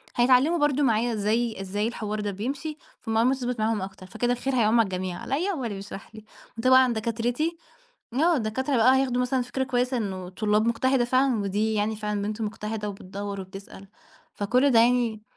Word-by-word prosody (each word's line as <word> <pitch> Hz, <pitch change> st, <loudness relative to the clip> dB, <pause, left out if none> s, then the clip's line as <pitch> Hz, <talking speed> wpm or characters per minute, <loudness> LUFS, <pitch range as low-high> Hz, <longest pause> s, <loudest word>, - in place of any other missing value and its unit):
هيتعلموا 255 Hz, +7 st, +4 dB
برضه 295 Hz, -2 st, +2 dB
معايا 235 Hz, -1 st, +2 dB
إزاي 220 Hz, 0 st, 0 dB
إزاي 205 Hz, +3 st, -2 dB
الحوار 215 Hz, -2 st, -4 dB
ده 205 Hz, -1 st, -2 dB
بيمشي، 275 Hz, +10 st, -4 dB, 0.2 s
فالمعلومة 225 Hz, +3 st, +2 dB
تثبَت 250 Hz, -3 st, -3 dB
معاهم 215 Hz, -2 st, 0 dB
أكتر 190 Hz, -1 st, -8 dB
فكده 240 Hz, +5 st, -1 dB
الخير 260 Hz, +2 st, -2 dB
هيّعُم 230 Hz, 0 st, +3 dB
على -, -, +6 dB
الجميع 185 Hz, -1 st, -4 dB
عليّا 355 Hz, +9 st, -1 dB
وعلى 270 Hz, -8 st, -4 dB
اللي 205 Hz, -, -5 dB
بيشرح 195 Hz, +2 st, -9 dB
لي 215 Hz, -, -11 dB, 0.3 s
وطبعًا 255 Hz, +1 st, +5 dB
دكاترتي، 240 Hz, +9 st, -1 dB, 0.6 s
آه 325 Hz, +5 st, +3 dB
الدكاترة 260 Hz, +4 st, -1 dB
بقى 250 Hz, +3 st, +5 dB
هياخدوا 250 Hz, -2 st, +1 dB
مثلًا 250 Hz, 0 st, 0 dB
فكرة 250 Hz, +2 st, -2 dB
كويسة 250 Hz, 0 st, 0 dB
إنه 190 Hz, -5 st, -4 dB
طلاب 210 Hz, +3 st, +1 dB
مُجتهدَة 250 Hz, +2 st, +2 dB
فعلًا 255 Hz, -2 st, +2 dB
ودي 210 Hz, +3 st, 0 dB
يعني 215 Hz, +1 st, 0 dB
فعلًا 210 Hz, -1 st, -3 dB
بنت 210 Hz, +2 st, -4 dB
مُجتهدَة 210 Hz, 0 st, -4 dB
وبتدوّر 200 Hz, 0 st, -6 dB
وبتسأل 195 Hz, +1 st, -11 dB, 0.5 s
فكل 250 Hz, +7 st, +2 dB
ده 235 Hz, -, +5 dB
يعني 235 Hz, -3 st, +2 dB
230 Hz, 175 wpm, -26 LUFS, 210-255 Hz, 0.6 s, على